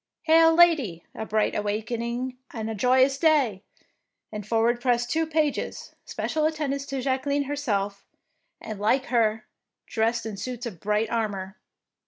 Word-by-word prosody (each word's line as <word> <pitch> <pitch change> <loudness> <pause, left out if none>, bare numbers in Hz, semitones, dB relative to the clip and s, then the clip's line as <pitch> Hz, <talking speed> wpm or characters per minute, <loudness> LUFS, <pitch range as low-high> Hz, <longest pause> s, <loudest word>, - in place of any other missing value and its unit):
Hail, 325 0 +6
Lady, 295 - +4
a 220 - -6
bright 215 0 +1
awakening 235 +4 -3
and 225 -1 -4
a - - -3
joyous 260 +5 +3
day"; 280 - +3 0.7
and 210 -1 -6
forward 230 +2 +2
pressed 240 -1 +1
two 320 0 +1
pages, 310 -2 -2
special 310 -1 -2
attendants 280 -3 -3
to 275 -2 -3
Jacque 260 +1 -1
line 285 0 +1
herself, 205 -9 -2 0.6
and 215 -2 -7
like 240 +6 +2
her 220 -2 +2 0.4
dressed 225 +1 0
in 220 - -3
83 - - -8
DEEDS - - -8
OF - - -5
DARING 250 -1 -4
suits 240 - -8
of - - -25
bright 210 +2 0
armour. 205 -4 -2
240 Hz, 165 wpm, -26 LUFS, 215-280 Hz, 0.7 s, Hail